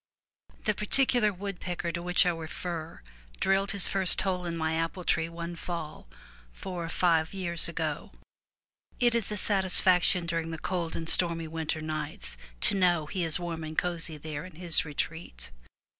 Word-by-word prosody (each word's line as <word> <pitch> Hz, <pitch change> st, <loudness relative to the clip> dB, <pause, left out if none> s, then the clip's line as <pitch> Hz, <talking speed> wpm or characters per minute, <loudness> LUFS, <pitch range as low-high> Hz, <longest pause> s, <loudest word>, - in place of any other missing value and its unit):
The 215 Hz, -, +1 dB
particular 215 Hz, +1 st, +3 dB
woodpecker 180 Hz, -3 st, -5 dB
to 170 Hz, -, -4 dB
which 180 Hz, +2 st, +3 dB
I 180 Hz, -, +3 dB
refer 165 Hz, 0 st, -6 dB, 0.4 s
drilled 195 Hz, +1 st, +1 dB
his 200 Hz, -2 st, +3 dB
first 190 Hz, -2 st, +3 dB
hole 180 Hz, -2 st, -2 dB
in 170 Hz, -1 st, -4 dB
my 160 Hz, 0 st, -1 dB
apple 165 Hz, +3 st, -3 dB
tree 165 Hz, -1 st, 0 dB
one 170 Hz, +1 st, -7 dB
fall 170 Hz, -, -7 dB, 0.4 s
four 175 Hz, -, -6 dB
or -, -, -6 dB
five 165 Hz, 0 st, +1 dB
years 170 Hz, -3 st, -1 dB
ago. 160 Hz, -2 st, -4 dB, 0.9 s
It 240 Hz, -1 st, +3 dB
is 230 Hz, -3 st, 0 dB
a 210 Hz, -, -1 dB
satis 190 Hz, -2 st, +5 dB
faction 180 Hz, -1 st, +4 dB
during 165 Hz, -1 st, -2 dB
the 165 Hz, -, -5 dB
cold 170 Hz, -1 st, -3 dB
and 165 Hz, -, -5 dB
stormy 165 Hz, -1 st, +3 dB
winter 160 Hz, 0 st, -3 dB
nights 155 Hz, -, -5 dB, 0.3 s
to -, -, +4 dB
know 175 Hz, -4 st, +2 dB
he 180 Hz, +3 st, -3 dB
is 165 Hz, +1 st, +7 dB
warm 170 Hz, -2 st, -5 dB
and 155 Hz, 0 st, -7 dB
cosy 170 Hz, -3 st, 0 dB
there 150 Hz, 0 st, -6 dB
in 185 Hz, -3 st, -12 dB
his 170 Hz, -1 st, +3 dB
retreat. 150 Hz, -, -5 dB
170 Hz, 170 wpm, -28 LUFS, 160-185 Hz, 0.9 s, is